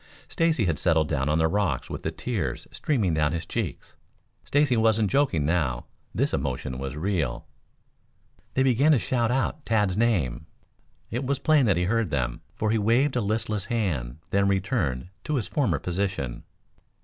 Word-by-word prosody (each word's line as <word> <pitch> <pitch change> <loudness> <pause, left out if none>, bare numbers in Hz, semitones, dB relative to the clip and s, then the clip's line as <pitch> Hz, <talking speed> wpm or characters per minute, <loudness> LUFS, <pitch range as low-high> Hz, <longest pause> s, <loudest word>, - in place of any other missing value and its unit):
Stacy 165 - +1
had 85 -5 0
settled 80 -3 +2
down 70 -1 0
on 75 - +2
the 80 0 +3
rocks 90 -6 0
with - - -6
the - - -2
tears - - -3
streaming 110 - 0
down 80 0 +1
his 85 0 -3
cheeks. 105 - -4 0.5
Stacy 145 -3 +2
wasn't 110 -2 +3
joking 135 - +2
now. 75 -7 0 0.3
This - - 0
emotion 65 -2 -2
was 70 +1 -4
real. 85 -4 -1 1.1
They 130 - +3
began 135 +4 +4
to - - +5
shout 120 0 0
out 135 +4 -1
Tad's 105 -5 +1
name. 80 - 0 0.6
It 120 +4 -2
was 140 +1 0
plain 150 -3 +3
that 95 -5 +3
he 90 - +1
heard 115 +2 +1
them, 60 -5 -2
for 110 0 0
he 110 - +2
waved 120 +7 +2
a 125 - +2
listless 105 -1 -1
hand 80 - -2
then 100 0 +3
returned 95 - 0 0.2
to 150 - -1
his 120 -6 -1
former 125 - +1
position. 90 -7 -3
100 Hz, 170 wpm, -26 LUFS, 75-120 Hz, 1.1 s, to